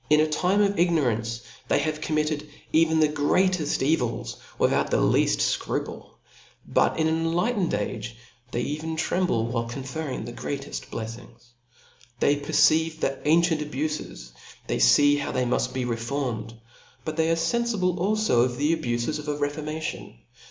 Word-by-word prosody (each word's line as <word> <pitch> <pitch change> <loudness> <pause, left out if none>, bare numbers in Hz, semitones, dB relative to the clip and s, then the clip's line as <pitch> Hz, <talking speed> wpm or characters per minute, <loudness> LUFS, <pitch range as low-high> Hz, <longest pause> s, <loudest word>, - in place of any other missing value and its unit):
a 150 +1 +5
time 185 +6 +2
of. 200 -2 0
ignorance 120 -9 +1 0.3
they - - +3
have 155 0 -1
committed 150 -1 -1 0.2
.even 160 0 +4
the 155 - +5
greateft 155 +3 +1 0.2
cvi^s 120 -2 -3 0.2
without - - +2
the - - +2
leaft - - +3 0.2
fcruple; - - -4 0.6
but - - +2
in 160 0 +2
an 160 - +1
enlightened 175 +5 0
age 105 +2 -4 0.3
they 120 - -2
even 155 +4 -3
tremble, 160 -8 0
while 115 0 -2
conferring 130 +1 -5
the 120 - -7
greateft 140 +2 -5
bleiUngs, 115 +1 -8 0.7
Th^ 145 +3 +2
perceivp 160 +2 +3
thaa^cient 160 +3 +2
abufes; 150 - -4 0.3
they - - -2
fee 145 - +5
how. 145 - -3
they 130 - 0
muft 125 +1 0
be 130 -1 -2
reformed 115 -1 -3
s - - -17 0.5
but 155 - -3
they 160 0 +1
are 165 - +3
fenfible 190 -1 0
alfo 210 - +2
of 125 -1 -4
the 150 +3 +2
abufes 120 0 -2
of 150 - -8
a 145 -1 -1
re 145 0 0
formation. 155 - -5
150 Hz, 150 wpm, -25 LUFS, 125-160 Hz, 0.7 s, a